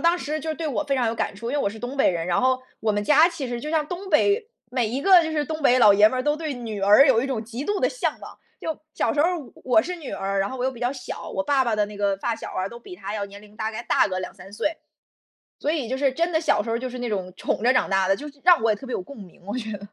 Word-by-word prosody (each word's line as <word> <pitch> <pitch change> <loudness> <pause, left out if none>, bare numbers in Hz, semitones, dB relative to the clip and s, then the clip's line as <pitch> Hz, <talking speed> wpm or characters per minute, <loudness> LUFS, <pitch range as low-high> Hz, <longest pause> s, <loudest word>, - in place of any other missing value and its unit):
当 340 +1 +3
时 305 +1 -3
就 320 +1 -3
对 325 - -4
我 250 -9 -1
非 275 -1 -1
常 245 -2 +1
有 225 - 0
感 - - -2
触， 230 +3 -5
因 290 - 0
为 - - +1
我 200 - 0
是 220 - -10
东 245 +4 -6
北 270 - +4
人。 170 -1 -3
然 175 - +1
后， 255 0 +2 0.2
我 220 - +1
们 205 0 -1
家 310 +6 +6
其 325 -7 -5
实 240 -1 -4
就 300 - -5
像 310 -2 +1
东 360 +4 -6
北， 410 +8 +3 0.2
每 245 -4 +1
一 255 +4 -2
个 365 +2 +7
就 320 - -3
是 300 -2 0
东 310 +1 -5
北 255 -2 +5
老 210 -4 +7
爷 210 +1 +7
们 255 +2 -2
都 295 0 +2
对 310 -2 -3
女 230 -5 -6
儿 210 +8 +7
有 235 -4 +4
一 270 - -1
种 230 -4 -2
极 240 +5 -6
度 410 +2 0
的 - - +2
向 - - -2
往。 - - -11 0.2
就， 320 - -3 0.2
小 - - +1
时 290 - +2
候， 340 - +4
我 280 - -11 0.2
我 325 - +7
是 360 - -4
女 310 -5 -8
儿 195 0 -1
然 195 - -1
后 260 - -6
我 250 - -1
又 265 - 0
比 240 - -12
较 245 +2 0
小， 255 - -7
我 290 - -2
爸 280 -2 +2
爸 230 -3 0
的 210 - +2
那 210 0 -10
个 200 -1 +1
发 230 +4 -2
小 - - -8
儿 185 - -2
啊， 195 - -3
都 235 +2 -11
比 360 +9 -11
他 210 - -6
要 205 -2 -2
年 200 0 -12
龄 210 0 -17
大 220 0 -2
概 220 - -5
大 - - +3
个 185 -1 -2
2-3 185 +1 -8
岁。 300 +9 -1 0.8
所 290 - -2
以 280 -8 -2
就 260 - -1
是 270 -1 +1
真 335 +4 0
的， 315 - +2
小 210 -10 +2
时 230 - -6
候 230 - 0
就 255 +2 -4
是 250 0 -7
那 245 -1 -3
种 185 -3 -3
宠 - - -2
着 255 +2 +5
长 255 - +2
大 190 -1 +2
的， 195 - +3
就 290 - -9 0.2
让 355 -2 +7
我 230 - +3
也 - - +1
特 265 - -10
别 255 - -5
有 - - -1
共 280 +8 -12
鸣， 190 -5 -13
我 210 +5 -4
觉 220 -3 -4
得。 200 - -6
250 Hz, 350 characters per minute, -24 LUFS, 210-300 Hz, 0.8 s, 个